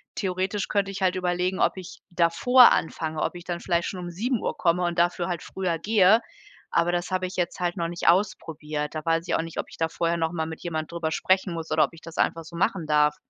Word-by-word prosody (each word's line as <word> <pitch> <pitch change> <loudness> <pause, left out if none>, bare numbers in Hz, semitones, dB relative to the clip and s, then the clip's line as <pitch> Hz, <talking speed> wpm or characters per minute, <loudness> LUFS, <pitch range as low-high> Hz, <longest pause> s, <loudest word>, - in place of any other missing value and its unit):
theoretisch 190 +1 -2
könnte 200 -1 0
ich 195 - -7
halt 185 -1 +2
überlegen, 180 +1 -1
ob - - +2
ich 185 -2 -9
davor 175 +9 +6
anfange, 160 -1 -1
ob - - -1
ich 175 0 -9
dann 175 -1 -3
vielleicht 170 -2 0
schon 185 - -5
um 175 0 -6
7:00 230 +7 -1
komme 180 0 +1
und 175 0 -1
dafür 175 0 +1
halt 175 -3 -3
früher 180 -4 -3
gehe. 210 +2 +5 0.5
Aber 170 +1 +2
das 175 +1 -2
habe 185 0 0
ich 180 - -9
jetzt 175 -1 -2
halt 175 -1 -1
noch 170 -1 -1
nicht 175 0 -4
ausprobiert. 155 -5 0
Da 155 - -4
weiß 165 +1 +1
ich - - +1
auch - - +1
nicht, 165 0 -6
ob - - -3
ich - - -13
da 165 - +1
vorher 170 +1 -1
noch 160 0 0
mal 160 -2 -2
mit 160 0 -7
jemand 160 -2 -4
drüber 170 -2 -2
sprechen 185 +2 +1
muss 165 -1 -6
oder 155 - +4
ob 145 - -13
ich 165 - -14
das 165 0 -11
einfach 165 0 +1
so 165 +2 -12
machen 170 0 0
darf. 150 0 +3
175 Hz, 250 wpm, -25 LUFS, 165-185 Hz, 0.5 s, davor